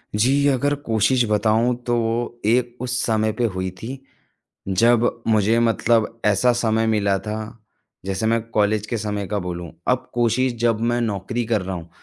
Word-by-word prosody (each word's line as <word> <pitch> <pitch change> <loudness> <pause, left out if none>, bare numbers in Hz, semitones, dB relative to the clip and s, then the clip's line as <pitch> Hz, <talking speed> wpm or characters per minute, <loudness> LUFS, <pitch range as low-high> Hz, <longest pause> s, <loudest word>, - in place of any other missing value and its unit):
जी, 135 +7 +3
अगर 140 +1 +2
कोशिश 115 +3 +2
बताऊँ 110 +3 +2
तो 120 - 0 0.5
एक 120 +2 +1
उस 125 0 -2
समय 110 -1 +1
पे 120 - +1
हुई 95 0 -2
थी। 130 +4 -5 0.7
जब 115 +4 +2
मुझे 110 +1 +3
मतलब 115 -1 +1
ऐसा 105 +4 +3
समय 110 0 +1
मिला 100 -2 +1
था, 105 +1 -5 0.7
जैसे 95 +2 -2
मैं 115 0 +2
कॉलेज 105 -1 +1
के 120 - -2
समय 105 -2 -3
का 105 +1 -2
बोलूँ 90 -2 -6 0.2
अब 130 0 0
कोशिश 120 +2 +1
जब 115 -2 +2
मैं 120 - 0
नौकरी 115 +2 -2
कर 110 -2 0
रहा 95 0 -4
हूँ, 85 -1 -8
110 Hz, 165 wpm, -22 LUFS, 105-120 Hz, 0.7 s, जी